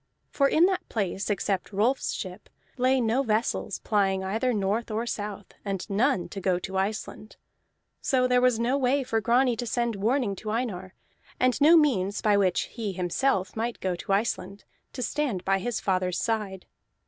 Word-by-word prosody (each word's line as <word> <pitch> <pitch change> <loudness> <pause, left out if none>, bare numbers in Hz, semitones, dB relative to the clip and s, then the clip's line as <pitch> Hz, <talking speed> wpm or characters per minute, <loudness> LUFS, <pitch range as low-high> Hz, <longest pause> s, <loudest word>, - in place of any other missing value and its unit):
For 275 - +3
in 325 +3 +5
that 375 -1 -1
place, 195 -2 -2
except 200 -2 -1
Rolf's 220 +7 +1
ship, 185 -1 -7 0.3
lay 260 +1 +2
no 235 +2 +2
vessels 225 -2 -1
plying 195 -3 +1
either 220 +7 0
north 210 +2 -1
or 220 +2 -2
south, 205 -3 -5
and 195 -3 -3
none 220 -1 +1
to 195 - -6
go 185 -1 +1
to 190 +1 -6
Iceland. 210 +2 -3 0.7
So 255 -1 +2
there 250 0 +3
was 250 -2 +3
no 245 +4 +1
way 270 +2 +2
for 225 -3 -1
Grani 245 +2 +3
to 240 +1 -3
send 235 -1 0
warning 220 +1 0
to 215 - -6
Einar, 205 -5 -3 0.4
and 255 +2 +2
no 320 +4 +8
means 205 - +2
by 210 -1 +3
which 190 -3 +2
he 220 -4 -5
himself 185 +3 0
might 230 +1 -3
go 185 -2 -1
to 175 - -6
Iceland, 200 -1 -1 0.3
to 250 - -3
stand 240 -8 -2
by 195 0 +2
his 240 +2 -2
father's 185 -2 0
side. 210 -5 -2
220 Hz, 175 wpm, -27 LUFS, 195-250 Hz, 0.7 s, no